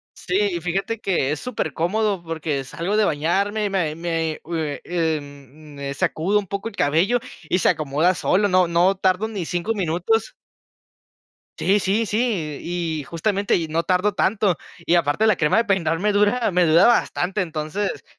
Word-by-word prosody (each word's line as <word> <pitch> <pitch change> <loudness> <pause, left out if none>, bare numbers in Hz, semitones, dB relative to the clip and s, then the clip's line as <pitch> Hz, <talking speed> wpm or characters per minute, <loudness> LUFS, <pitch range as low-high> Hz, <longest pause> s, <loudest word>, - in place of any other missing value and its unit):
Sí. 195 +1 0
Y 170 - -3
fíjate, 195 +6 -2
que 175 -10 0
es 150 - -2
súper 220 - -3
cómodo, 195 +3 0
porque 160 -4 -3
salgo 170 +10 -3
de 215 - +4
bañarme, 200 +7 0
y - - 0
me 175 -6 -1
me 165 -1 -2
u 170 - -8
em, 150 -2 -4
me 140 0 -5
sacudo 175 +8 +1
un 200 - -7
poco 200 +4 -4
el 210 - -16
cabello, 175 +12 +2 0.3
y 180 - +2
se - - +3
acomoda 155 +4 +1
solo. 200 +4 +2
No 185 -2 +3
no 175 +3 +3
tardo 190 +2 +1
ni 205 -6 -4
5 175 +6 -2
minutos. 185 +3 0 1.3
Sí, 200 +2 +3
sí, 205 +4 +1
sí. 205 - -1
Y 170 -3 -3
justamente, 200 +7 0
no 160 +2 0
tardo 185 +4 +1
tanto, 195 -4 +1 0.3
y - - +2
aparte, 170 +4 +2
la 215 -2 +4
crema 150 +5 +2
de 230 - +3
peinar 170 -6 +1
me 210 +4 +1
dura 210 +3 +2
me 180 0 +3
dura 165 +3 +6
bastante. 205 -4 +1
Entonces 165 +4 -3
180 Hz, 170 wpm, -22 LUFS, 160-205 Hz, 1.3 s, dura